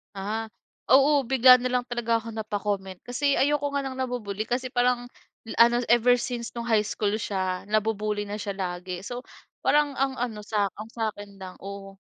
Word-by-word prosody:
Ah. 210 +3 -3 0.5
Oo, 280 +1 +5
bigla 255 0 +7
nalang 250 0 -1
talaga 235 -1 0
ako 230 - -8
napa-comment, 205 -3 -3
kasi 280 +3 +1
ayoko 285 0 +2
nga 280 - +1
ng 260 - -6
nabu-bully. 240 -6 -3
Kasi, 250 +3 -1
parang 245 0 +1 0.5
ano, 235 +1 +6
ever 245 +1 +5
since 240 -2 -4
no'ng 235 0 -5
high 215 -2 +4
school 210 0 -1
siya, 185 -3 -2
nabu-bully 215 0 0
na 205 - -4
siya 205 -1 -4
lagi. 180 -1 -4
So 245 +5 -6 0.4
parang 295 -1 +3
ang 270 0 +1
ano 225 -4 -3
sa 205 -2 +1
ang 215 +1 -8
sakin 205 -3 -5
lang 185 -1 -8
oo. 195 0 -8
225 Hz, 170 wpm, -26 LUFS, 205-250 Hz, 0.5 s, bigla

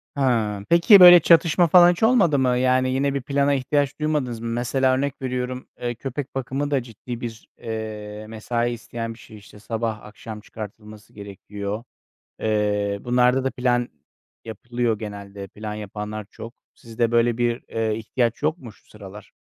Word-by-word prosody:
Ha, 115 -7 0
peki, 170 +4 +7
böyle 175 -1 +11
çatışma 170 +1 +4
falan 175 +1 +7
hiç 175 - -4
olmadı 200 - +4
mı? 125 -1 +2
Yani, 130 0 +2
yine 135 +1 0
bir 140 - -2
plana 140 +1 +1
ihtiyaç 140 +2 -1
duymadınız 145 -6 -1
mı? 115 - -6
Mesela 125 +3 +1
örnek 140 +1 -3
veriyorum, 125 0 -4
eee, 120 0 -2
köpek 135 +3 -6
bakımı 135 +2 -3
da 135 -4 +1
ciddi 120 +1 -9
bir, 115 -2 -7
eee, 110 -2 -6
mesai 115 +2 -2
isteyen 115 0 -6
bir 115 - -18
şey. 110 -2 -13
İşte, 105 0 -16
sabah 110 0 -3
akşam 105 +1 -10
çıkartılması 105 0 -11
gerekiyor. 100 +1 -7 0.6
Eee, 105 -2 0
bunlarda 125 +1 +2
da 135 - -1
plan 120 -1 0 0.6
yapılıyor 115 0 -2
genelde. 100 -2 -8
Plan 105 +2 -7
yapanlar 105 0 -6
çok. 115 +1 -10 0.2
Sizde 115 0 -2
böyle 120 0 +2
bir, 120 0 0
eee, 110 -1 -1
ihtiyaç 115 +1 -2
yok 155 +3 0
mu 125 -8 -11
şu - - -27
sıralar? 105 -1 -12
120 Hz, 160 wpm, -23 LUFS, 110-135 Hz, 0.6 s, böyle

